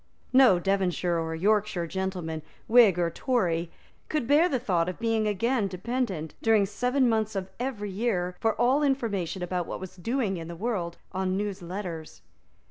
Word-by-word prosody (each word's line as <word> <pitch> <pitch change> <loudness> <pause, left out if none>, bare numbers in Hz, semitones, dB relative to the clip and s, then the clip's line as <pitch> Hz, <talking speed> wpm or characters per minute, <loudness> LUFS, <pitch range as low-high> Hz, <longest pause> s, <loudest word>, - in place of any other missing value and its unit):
No 255 -8 +7
Devonshire 180 -2 0
or 160 0 -3
Yorkshire 205 0 +1
gentleman, 180 -3 -3 0.3
Whig 225 -6 +6
or 170 -1 +1
Tory, 175 -11 0 0.4
could 305 -6 0
bear 300 +7 +4
the 270 - +1
thought 180 -8 0
of 180 - -6
being 225 -2 +1
again 215 +2 +1
dependent, 190 - -3
during 220 -3 +4
seven 250 +6 +1
months 220 -2 0
of 190 -1 -3
every 225 -6 -3
year, 185 -4 -1
for 225 -1 +1
all 255 +5 +3
information 205 - -1
about 180 -1 -2
what - - -5
was 185 -1 -8
doing 220 0 -1
in 165 -1 -6
the 170 - -7
world, 180 -4 -2
on 185 0 -1
newsletters. 185 -4 -5
195 Hz, 160 wpm, -27 LUFS, 180-235 Hz, 0.4 s, No